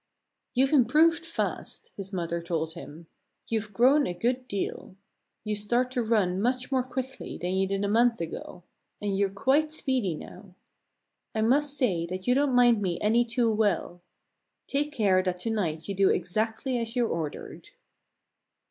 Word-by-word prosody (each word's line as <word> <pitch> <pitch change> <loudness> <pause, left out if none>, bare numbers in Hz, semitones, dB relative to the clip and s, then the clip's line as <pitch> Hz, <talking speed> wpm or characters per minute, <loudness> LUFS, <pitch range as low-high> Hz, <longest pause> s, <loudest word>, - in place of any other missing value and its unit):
"You've 265 +3 +3
improved 310 +6 +4
fast," 330 - -4
his 195 -1 -7
mother 170 -2 -2
told 165 -1 -2
him. 160 +2 -10 0.4
"You've 220 -2 -2
grown 260 +8 +4
a 175 - -3
good 250 +6 -1
deal. 200 -2 -4 0.5
You 215 -1 -2
start 240 +5 0
to 255 -2 0
run 205 -5 +1
much 250 +3 0
more 260 -1 +3
quickly 260 +1 -5
than 180 +1 -2
you 190 0 +1
did 195 +1 -1
a - - 0
month 230 +3 +3
ago; 170 +1 -6 0.4
and 205 -1 -1
you're 200 0 +2
quite 275 +10 +1
speedy 255 - -1
now. 180 +4 -12 0.8
I 220 - +1
must 285 +5 +2
say 180 - +1
that 185 +1 -5
you 250 - +4
don't 275 -1 +2
mind 240 -3 +5
me 180 -3 -1
any 225 +3 +3
too 235 -1 +1
well. 200 -4 0 0.6
Take 290 +2 -1
care 200 -8 +3
that 185 -1 -2
to 225 - -1
night 165 -8 -2
you 200 - -2
do 195 0 +3
exactly 220 +7 -1
as 230 +1 -4
you're 240 -2 +2
ordered!" 160 -6 -5
220 Hz, 165 wpm, -27 LUFS, 185-255 Hz, 0.8 s, mind